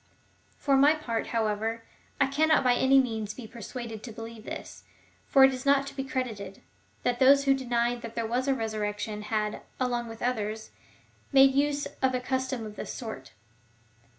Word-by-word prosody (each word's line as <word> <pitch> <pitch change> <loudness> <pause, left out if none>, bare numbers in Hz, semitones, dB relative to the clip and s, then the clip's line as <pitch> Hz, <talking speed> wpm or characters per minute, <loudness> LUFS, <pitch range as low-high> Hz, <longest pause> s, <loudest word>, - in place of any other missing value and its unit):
For 275 -2 +2
my 290 +3 +6
part, 235 -7 -3
however, 225 0 -1 0.4
I 275 - +5
cannot 305 +3 +3
by 250 -1 +4
any 265 +2 +5
means 220 -5 -2
be 250 - -8
persuaded 230 0 -7
to 235 - -8
believe 225 0 -9
this,^ - - -7 0.5
for 270 - +6
it 265 0 +6
is 255 0 -5
not 280 0 +3
to 275 0 -9
be 270 - -2
credited, 235 -8 -4 0.4
that 245 0 0
those 275 +1 +6
who 275 - +5
denied 240 -2 0
that 230 -1 -8
there 230 - -1
was 245 +4 -1
a 270 - +3
resurrection 210 -2 -3
had, 210 0 -2 0.2
along 240 -2 -1
with 225 0 -10
others^ 220 -3 -2 0.6
made 270 -1 +7
use 285 +1 +1 0.2
of 260 -1 +2
a - - 0
custom 260 -2 -2
of 210 -1 -9
this - - -5
sort. 220 - -7
245 Hz, 180 wpm, -28 LUFS, 220-270 Hz, 0.6 s, made